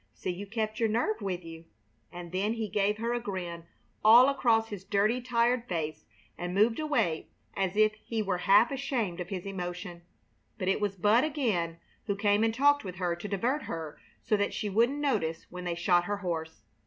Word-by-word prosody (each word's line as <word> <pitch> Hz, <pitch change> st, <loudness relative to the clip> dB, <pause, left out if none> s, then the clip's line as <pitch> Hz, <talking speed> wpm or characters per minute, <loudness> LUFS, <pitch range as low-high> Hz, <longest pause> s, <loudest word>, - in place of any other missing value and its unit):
See 185 Hz, -, -3 dB
you 195 Hz, +3 st, -7 dB
kept 215 Hz, 0 st, -3 dB
your 225 Hz, -2 st, +2 dB
nerve 220 Hz, 0 st, 0 dB
with 180 Hz, -3 st, -3 dB
you!" 165 Hz, 0 st, -10 dB, 0.5 s
and 175 Hz, -1 st, -8 dB
then 200 Hz, +4 st, 0 dB
he 225 Hz, -2 st, -3 dB
gave 205 Hz, +1 st, +1 dB
her 230 Hz, +2 st, -1 dB
a 240 Hz, -, 0 dB
grin 180 Hz, -6 st, -5 dB, 0.4 s
all 235 Hz, +5 st, +8 dB
across 230 Hz, -5 st, +2 dB
his 200 Hz, -3 st, -7 dB
dirty, 210 Hz, +5 st, +1 dB
tired 240 Hz, 0 st, +1 dB
face, 160 Hz, -3 st, -3 dB, 0.3 s
and 175 Hz, +1 st, -3 dB
moved 225 Hz, +5 st, +3 dB
away 290 Hz, -, 0 dB, 0.3 s
as 190 Hz, -1 st, -1 dB
if 215 Hz, 0 st, +5 dB
he 220 Hz, 0 st, -4 dB
were 190 Hz, -3 st, -1 dB
half 210 Hz, +6 st, +6 dB
ashamed 255 Hz, -10 st, -2 dB
of 175 Hz, 0 st, -5 dB
his 185 Hz, -2 st, -5 dB
emotion. 180 Hz, -2 st, -5 dB, 0.6 s
But 185 Hz, -, -1 dB
it 195 Hz, -, +1 dB
was 205 Hz, -1 st, -1 dB
Bud 210 Hz, +6 st, +4 dB
again 220 Hz, -, -1 dB, 0.3 s
who 200 Hz, -, 0 dB
came 205 Hz, +1 st, +2 dB
and 225 Hz, -, +3 dB
talked 285 Hz, +5 st, +3 dB
with 185 Hz, -3 st, -6 dB
her 180 Hz, -2 st, -1 dB
to 175 Hz, +4 st, -7 dB
divert 240 Hz, +9 st, -1 dB
her 160 Hz, -2 st, -6 dB, 0.2 s
so 215 Hz, -, +2 dB
that 205 Hz, -, -1 dB
she 210 Hz, -, -3 dB
wouldn't 235 Hz, +7 st, +2 dB
notice 210 Hz, -, -1 dB
when 180 Hz, 0 st, -7 dB
they 175 Hz, -1 st, -1 dB
shot 175 Hz, 0 st, +2 dB
her 205 Hz, +1 st, -2 dB
horse. 165 Hz, -4 st, -4 dB
205 Hz, 200 wpm, -29 LUFS, 180-230 Hz, 0.6 s, all